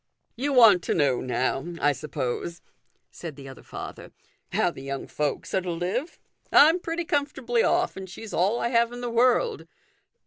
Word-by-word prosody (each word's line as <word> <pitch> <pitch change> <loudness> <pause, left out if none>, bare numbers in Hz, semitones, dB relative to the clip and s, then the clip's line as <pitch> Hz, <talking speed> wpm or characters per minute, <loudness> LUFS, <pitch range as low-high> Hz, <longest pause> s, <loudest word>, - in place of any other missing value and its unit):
" - - -49
You 275 +5 -1
want 225 -8 +7
to - - 0
know, 140 -6 +2
now, 130 +1 -1 0.2
I 145 - +3
suppose," 155 +3 -4 0.5
said 165 -4 -8
the 135 -1 -11
other 135 - -11
father, - - -9 0.2
" - - -43
how - - +2
the - - -11
young 135 0 -5
folks 150 -1 -3
are 190 - +2
to 180 - -5
live? 185 - -3 0.3
I'm 320 +5 +7
pretty 335 0 -3
comfortably 270 -6 0
off, - - +1
and 190 -1 -8
she's 210 +4 -9
all 200 +6 +2
I 235 - 0
have 235 -1 +2
in 245 0 -7
the 240 -1 -3
world." 255 - +2
210 Hz, 185 wpm, -26 LUFS, 150-250 Hz, 0.5 s, want